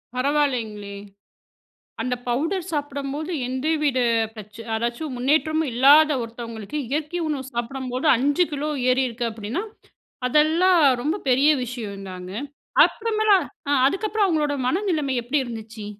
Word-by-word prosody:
பரவாயில்லைங்களே! 250 -7 -1 1.1
அந்த 250 -1 -1
பவுடர் 330 +9 -1
சாப்படம்போது 290 +1 -3 0.2
எந்தவித 285 +1 0 0.4
பிரச்ன 215 +1 -10
ஏதாச்சும் 240 +6 -3
முன்னேற்றமும் 310 +4 +1
இல்லாத 290 +5 +6
ஒருத்தவங்களுக்கு 230 +1 -6
இயற்கை 305 +5 -2
உணவு 290 -4 -2
சாப்பிடும்போது 255 +3 -3
5 285 +8 +2
கிலோ 295 +1 -2 0.2
ஏறிருக்கு 250 -2 0
அப்டின்னா, 225 - -4 0.6
அதெல்லாம் 325 +6 +4 0.2
ரொம்ப 305 +7 0
பெரிய 265 +4 +4
விஷயந்தாங்க. 200 -6 -7 0.5
அப்றமேலா 435 -2 +2 0.3
ஆ - - +2 0.2
அதுக்கப்றம் 415 +6 0
அவங்களோட 305 -5 +1
மனநிலம 320 -4 0
எப்டி 245 +5 -1
இருந்துச்சு? 225 -3 -8
275 Hz, 105 wpm, -23 LUFS, 235-310 Hz, 1.1 s, இல்லாத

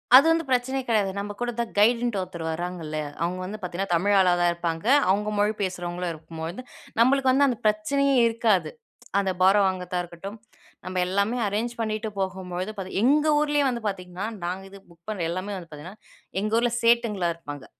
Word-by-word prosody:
அது 275 +4 +9
வந்து 330 -1 +1
பிரச்சனை 260 +1 +1
கிடையாது. 210 -4 +2
நம்ம 205 +1 -4
கூட 245 - 0
தான் 235 -1 -2
கைடுன்ட்டு 235 -1 +3
ஒருத்தர் 170 -3 -6
வராங்கல்ல, 165 -2 -4 0.3
அவுங்க 180 +2 -2
வந்து 210 +3 -6
பாத்தீங்கன்னா, 180 +1 -4
தமிழ் 200 +4 +2
ஆளா 180 -2 +5
தான் 175 - +4
இருப்பாங்க. 170 +1 -3 0.2
அவுங்க 210 +2 +2
மொழி 210 +1 +2
பேசுறவங்களும் 180 -1 -3
இருக்கும்பொழுது, 165 +7 -7 0.4
நம்மளுக்கு 265 +2 +4
வந்து 280 +2 +4
அந்த 245 - 0
பிரச்சனையே 275 +7 +2
இருக்காது. 225 -4 +1 0.5
அந்த 195 -1 0
பாரோ 195 +2 +6
வாங்கத்தா 180 -1 -3
இருக்கட்டும், 175 +5 -9 0.5
நம்ப 185 0 -4
எல்லாமே 200 +6 0
அரேஞ்ச் 220 +4 -2
பண்ணிட்டு 215 0 -2
போகும்பொழுது 185 0 -3
பாத்தீங் 190 0 -3
எங்க 295 +4 +4
ஊர்லேயே 295 -1 +2
வந்து 235 -2 -4
பாத்தீங்கன்னா, 185 +1 -5 0.2
நாங்க 185 +2 -3
இது 200 - -11
புக் 170 0 -22
பண்ணு, 185 -6 -2
எல்லாமே 190 +3 -4
வந்து 170 -3 -10
பாத்தீங்கன்னா, 165 +8 -10 0.4
எங்க 215 - -2
ஊர்ல 240 0 +1
சேட்டுங்களா 230 -6 +3
இருப்பாங்க. 145 -4 -9
195 Hz, 170 wpm, -25 LUFS, 180-230 Hz, 0.5 s, அது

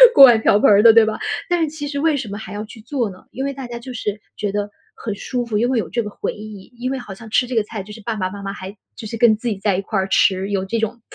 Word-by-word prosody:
锅 275 - +10
碗 240 -3 +6
瓢 205 - +4
盆 - - +5
儿 205 -1 +7
的， 225 0 +8
对 225 -1 +7
吧？ 215 0 -3 0.3
但 350 -1 +2
是 315 - +1
其 290 -1 -6
实 285 -1 -3
为 315 0 +2
什 260 -6 -4
么 205 - -5
还 220 - -8
要 205 +1 -4
去 220 +1 -12
做 240 -2 -2
呢？ 185 - -13
因 265 - -4
为 280 - -1
大 265 -2 -7
家 240 0 -6
就 255 +2 -8
是 210 -3 -4 0.2
觉 205 -1 -2
得 205 0 -2 0.3
很 215 - -4
舒 245 +4 -3
服， 220 -3 -1
因 240 +3 +2
为 255 -3 +2
有 185 - -3
这 235 +6 -1
个 210 - -5
回 - - -4
忆， 210 0 -10
因 255 +2 -2
为 270 - -2
好 210 -5 -8
像 220 +3 -12
吃 240 +3 +2
这 255 - -4
个 220 - +3
菜， 210 -1 -6
就 210 - -12
是 220 - -11
爸 225 +2 -3
爸 185 -3 -2
妈 200 +1 -8
妈 195 - -3
还 195 0 -8 0.2
就 220 - -7
是 230 - -5
跟 225 -1 +5
自 240 - -5
己 210 - -1
在 195 -1 +1
一 - - -1
块 200 0 -2
儿 190 - -1
吃， 190 +1 +3
有 195 -1 0
这 230 +4 -2
种 225 +2 -3
220 Hz, 355 characters per minute, -20 LUFS, 205-240 Hz, 0.3 s, 锅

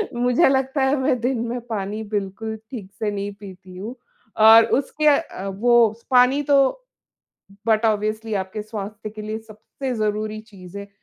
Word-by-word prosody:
मुझे 245 +6 +3
लगता 265 +1 0
है, 265 +2 +3
मैं 260 -2 +1
दिन 250 0 0
में 245 +2 -3
पानी 210 -1 -4
बिल्कुल 210 +2 -3 0.2
ठीक 205 -7 -8
से 215 -2 -1
नहीं 200 0 -4
पीती 190 -2 -12
हूँ। 220 +7 -6 0.4
और 220 +1 +8
उसके 285 +3 -1
अ, 285 - +1
वो 225 +3 +3
स - - -35
पानी 255 +3 +5
तो, 275 - +3 0.9
बट 220 0 +2
ऑब्वियसली 215 +1 -1
आपके 190 +2 -3
स्वास्थ्य 215 0 -7
के 215 0 -9
लिए 215 +1 -4
सबसे 225 +4 -7
ज़रूरी 215 0 -2
चीज़ 200 -3 -12
है। 200 0 -9
220 Hz, 165 wpm, -22 LUFS, 205-245 Hz, 0.9 s, और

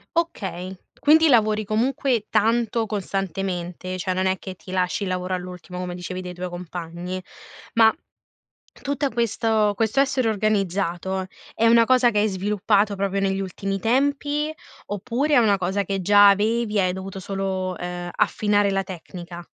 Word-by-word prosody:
Okay. 190 - -2 0.2
Quindi 315 +2 +5
lavori 215 -4 +3
comunque 235 +2 0
tanto 230 +1 +2
costantemente. 185 -3 -3
Cioè 185 +1 -1
non 185 +1 0
è 190 0 +1
che 190 -1 -8
ti 185 - -12
lasci 185 +2 0
il 195 - -2
lavoro 185 0 -2
all'ultimo 180 0 -8
come 180 -1 -4
dicevi 180 +1 -5
dei 180 -1 -7
tuoi 180 +1 -5
compagni. 175 +1 -6 0.5
Ma, 225 -1 +6 0.9
tutta 280 0 -1
questo 225 -2 +1
questo 225 +4 +1
essere 265 -3 +1
organizzato, 190 -3 -1 0.3
è 230 - +2
una 230 0 +6
cosa 255 -1 +4
che 210 - +1
hai 210 - +3
sviluppato 205 +1 +1
proprio 195 0 -1
negli 195 0 0
ultimi 195 +1 -3
tempi, 285 +6 0 0.3
oppure 250 +9 0
è - - +6
una 215 -4 +4
cosa 190 +2 -1
che 195 0 -2
già 205 +2 +7
avevi 215 +2 +1
hai 185 -1 +2
dovuto 190 +1 -6
solo, 190 -1 -3
ehm, 175 0 -5
affinare 205 -1 +2
la 195 0 0
tecnica? 175 -1 -9
195 Hz, 155 wpm, -23 LUFS, 185-225 Hz, 0.9 s, già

